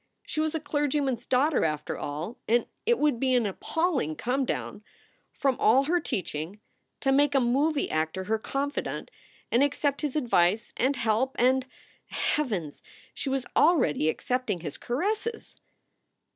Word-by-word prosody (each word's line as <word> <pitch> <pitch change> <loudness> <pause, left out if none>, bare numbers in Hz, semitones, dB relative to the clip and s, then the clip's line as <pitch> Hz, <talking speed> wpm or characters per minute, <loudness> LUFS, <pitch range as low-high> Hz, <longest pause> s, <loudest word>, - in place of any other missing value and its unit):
She - - -4
was 315 +1 0
a - - 0
clergyman 290 -2 0
s 235 - -16
daughter, 270 +3 +3
after 150 -1 -1
all, 155 +10 -5
and 235 +2 +3 0.2
it 475 0 +4
would 295 -6 +2
be 260 0 +2
an 240 -3 +3
appalling 275 - -1
come 260 - 0
down 210 - -4 0.5
from 270 -2 0
all 255 +5 +5
her 345 +5 +2
teaching, 180 - -4 0.4
to 270 - +2
make 285 +1 +3
a - - +6
movie 275 +5 +2
actor 160 +4 -1
her 220 +3 0
confidant 280 - -3 0.4
and 240 - +4
accept 285 0 +1
his 295 -3 -2
advice 220 - +2
and 265 +3 +1
help 235 +3 0
and 260 +1 +3 0.4
Heavens! 200 - -2 0.3
she 275 - -4
was 265 -1 -1
already 250 - +4
accepting 250 -1 -1
his 150 -4 -5
caresses! 430 - -3
260 Hz, 150 wpm, -27 LUFS, 215-290 Hz, 0.5 s, a